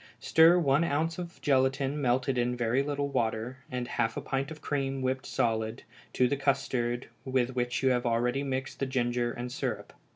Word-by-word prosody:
Stir 165 +2 +6
one 145 -2 +3
ounce 165 +2 0
of 170 -1 -7
gelatine 135 +1 +2
melted 130 +1 +1
in 125 0 0
very 120 +2 +1
little 145 0 -2
water, 120 -1 -1
and 125 -1 -3
half 115 -2 -1
a - - -2
pint 135 +1 -2
of 160 -1 -8
cream 135 -2 -2
whipped 130 0 -1
solid, 110 +1 -1 0.3
to 125 - +3
the 140 - 0
custard 130 -3 0 0.2
with 130 -1 0
which 125 0 -1
you 130 - +5
have 125 -1 +1
already 120 +3 +1
mixed 135 -1 -3
the 135 - 0
ginger 120 -2 0
and 120 +1 -5
syrup. - - -4
130 Hz, 185 wpm, -29 LUFS, 120-140 Hz, 0.3 s, Stir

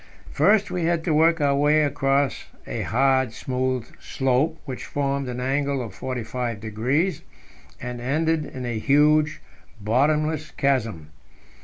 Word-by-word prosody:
First 205 0 +3
we 175 -2 -1
had 170 -1 +1
to 160 - 0
work 165 +2 +4
our 140 -1 +3
way 150 +2 +3
across 140 -1 0 0.2
a - - -4
hard, 130 0 +2
smooth 130 -1 -2
slope, 135 +5 0
which 130 -2 -6
formed 140 -2 -2
an 125 0 -4
angle 140 +2 0
of 115 -6 -6
45 125 -1 -4
degrees, 125 - -1 0.6
and 125 -1 -6
ended 155 +5 0
in 130 -3 -7
a 120 -2 -2
huge, 150 +4 +3 0.4
bottomless 150 +8 +1
chasm. 115 - -1
135 Hz, 135 wpm, -24 LUFS, 125-150 Hz, 0.6 s, work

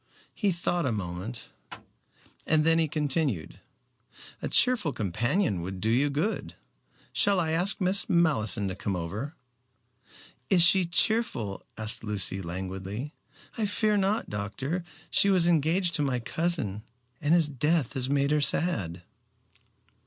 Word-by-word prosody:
He 205 -4 0
thought 175 -2 -1
a - - 0
moment 100 +3 -5 1.0
and 155 -1 +3
then 165 0 +3
continued, 145 - -1 0.8
"A - - -3
cheerful 240 - +4
companion 110 - 0
would 95 +2 -6
do 110 +4 0
you 135 +5 +2
good. 155 +10 -2 0.6
Shall 200 -2 +4
I 160 -2 0
ask 175 +5 +1
Miss 190 +1 +1
Malleson 120 - +2
to 95 - -5
come 100 0 -3
over." 100 - -5 1.1
"Is 180 -3 +6
she 185 +1 +5
cheerful?" 170 - +1
asked 110 +1 -1
Lucy 95 -3 -1
languidly. 95 - -5 0.5
"I 215 - +1
fear 210 +1 +1
not, 205 +2 0
doctor. 130 - -4 0.3
She 200 - +5
was 185 -3 +4
engaged 170 +2 +2
to 150 - 0
my 135 -3 0
cousin, 135 - -2 0.4
and 155 +2 +3
his 165 -3 +4
death 150 0 0
has 130 -1 -2
made 140 0 +1
her 150 0 +2
sad." 95 - 0
145 Hz, 135 wpm, -27 LUFS, 105-175 Hz, 1.1 s, Is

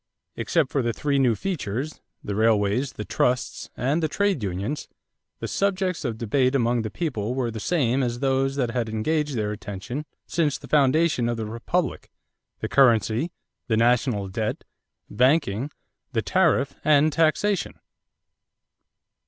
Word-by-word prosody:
Except 160 -6 0
for 125 -4 +1
three 140 +4 0
new 125 -4 +3
features 150 - -3 0.2
the 100 - -3
railways, 110 +4 +2
the 105 - -6
trusts, 125 +5 -1
and 140 +7 +1
the 160 - +2
trade 200 - 0
unions 100 +8 -3 0.5
the - - -4
subjects 190 -4 0
of 120 -5 -2
debate 130 +4 +1
among 120 -2 +2
the 110 - -3
people 125 -5 -2
were 125 -3 -1
the 110 - -6
same 135 -1 +1
as 120 -2 -1
those 135 +1 +1
that 125 -4 0
had 120 -2 -1
engaged 150 +6 -1
their 105 -2 -1
attention 105 +8 -6 0.2
since 155 -4 0
the - - -12
foundation 145 -3 +3
of 120 - -1
the 110 - -3
republic: 120 +8 -2 0.5
the - - -1
currency, 120 - +3 0.4
the 110 -3 +1
national 120 -3 +2
debt, 105 +3 -3 0.4
banking, 125 0 +2 0.4
the 115 -2 0
tariff, 160 -7 +2
and 150 0 +4
taxation. 165 +5 +1
130 Hz, 145 wpm, -25 LUFS, 110-150 Hz, 0.5 s, and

